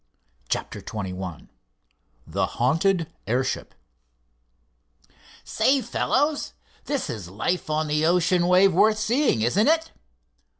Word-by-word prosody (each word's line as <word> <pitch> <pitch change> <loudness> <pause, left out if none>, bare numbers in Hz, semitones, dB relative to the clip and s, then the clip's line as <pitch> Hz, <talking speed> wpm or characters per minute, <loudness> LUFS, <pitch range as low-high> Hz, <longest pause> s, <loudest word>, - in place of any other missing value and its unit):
CHAPTER - - -3
XXI 95 -5 -6 0.8
THE - - -1
HAUNTED 165 +6 +1
AIRSHIP 125 +3 -2 1.7
"Say, 275 +1 +2
fellows, 295 0 0 0.3
this 285 -3 -2
is 95 -6 -6
life 155 - -2
on 155 +1 0
the 150 0 0
ocean 175 0 +2
wave 185 +1 +5
worth 215 +5 +4
seeing, 220 - +1
isn't 195 - +2
it?" 325 +1 +2
175 Hz, 100 wpm, -24 LUFS, -, 1.7 s, wave